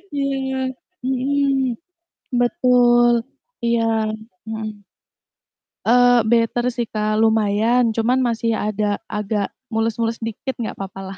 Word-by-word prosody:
Iya. 270 -1 -1 0.5
Mhm, 265 0 +1 0.6
betul, 245 -3 +4 0.5
iya. 235 0 +2 0.7
Mhm. 215 -2 -6 1.0
Eee, 245 0 +5
better 230 +1 +2
sih, 235 -1 -2
Kak, 215 0 -1
lumayan. 225 +2 +2
Cuman 235 +4 +1
masih 230 -1 0
ada 210 -1 -1
agak 210 -1 -2 0.2
mules-mules 225 0 -1
dikit 225 +4 -4
nggak 230 - -4
papalah. 195 0 -7
230 Hz, 95 wpm, -21 LUFS, 215-245 Hz, 1.0 s, Eee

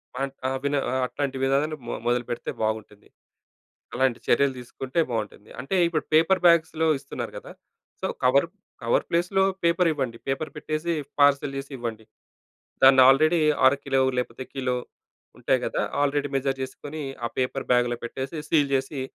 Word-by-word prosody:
Monte 135 +1 -3
ఆ! - - +1
విన 140 0 0 0.2
ఆ! - - -2
అట్లాంటి 140 -1 -3
విధానాలు 140 +3 +1
మొ - - -3
మొదలుపెడితే 120 -1 -1
బాగుంటుంది. 110 -1 -4 0.9
అలాంటి 130 -1 +1
చర్యలు 135 +2 +3
తీసుకుంటే 130 +5 -3
బాగుంటుంది. 105 -2 -5
అంటే 135 +9 -4
ఇప్పుడు 165 -2 -1
పేపర్ 165 +4 +4
బ్యాగ్స్‌లో 160 -1 +4
ఇస్తున్నారు - - -6
కదా! - - -11 0.5
సో, - - -1 0.2
కవరు 140 +5 +4 0.3
కవర్ 115 - +1
ప్లేస్‌లో 180 +3 +1 0.2
పేపర్ 170 +1 +3
ఇవ్వండి 130 -6 -3
పేపర్ 140 +3 -2
పెట్టేసి 155 +3 -2 0.3
పార్సెల్ 140 -1 +3
చేసి 135 +1 -7
ఇవ్వండి. 115 -2 -5 0.8
దాన్ని 135 0 +8
ఆల్రెడీ 155 +5 +4 0.3
అర 130 - +6
కిలో 135 -1 +1 0.2
లేకపోతే 130 +1 -3
కిలో 130 -2 -1 0.6
ఉంటాయి - - +1
కదా! - - -2 0.2
ఆల్రెడీ 145 0 0
మెజర్ 135 0 -1
చేసుకొని 145 +3 -7 0.2
ఆ - - -2
పేపర్ 130 +1 -1
బ్యాగ్‌లో 120 -1 +2
పెట్టేసి 130 +6 -5
సీల్ 145 -4 +3
చేసి 135 +1 -3
135 Hz, 145 wpm, -25 LUFS, 125-155 Hz, 0.9 s, దాన్ని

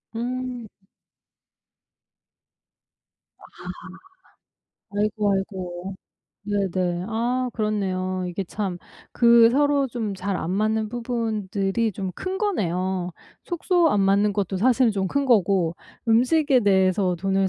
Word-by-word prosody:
음. 250 0 -4 2.7
아. - - -18 1.6
아이고, 210 -1 +1
아이고. 190 -1 -4 0.5
네네. 185 -3 -1
아 245 +3 0
그렇네요. 185 -4 -1
이게 185 +2 -4
참 185 -1 -4 0.3
그 235 -1 +6
서로 285 +1 +2
좀 225 -4 -3
잘 195 0 -2
안 170 - -3
맞는 215 +2 0
부분들이 220 -3 -1
좀 190 0 -4
큰 380 0 -4
거네요. 185 - -1 0.3
숙소 350 -1 +2
안 205 - +2
맞는 200 +1 +3
것도 195 -2 -2
사실은 245 +3 +3
좀 190 -2 -1
큰 280 +5 0
거고 190 -7 +3 0.3
"음식에 255 +4 +4
대해서 190 -2 +2
돈을 195 +1 +1
205 Hz, 195 characters per minute, -24 LUFS, 190-240 Hz, 2.7 s, 그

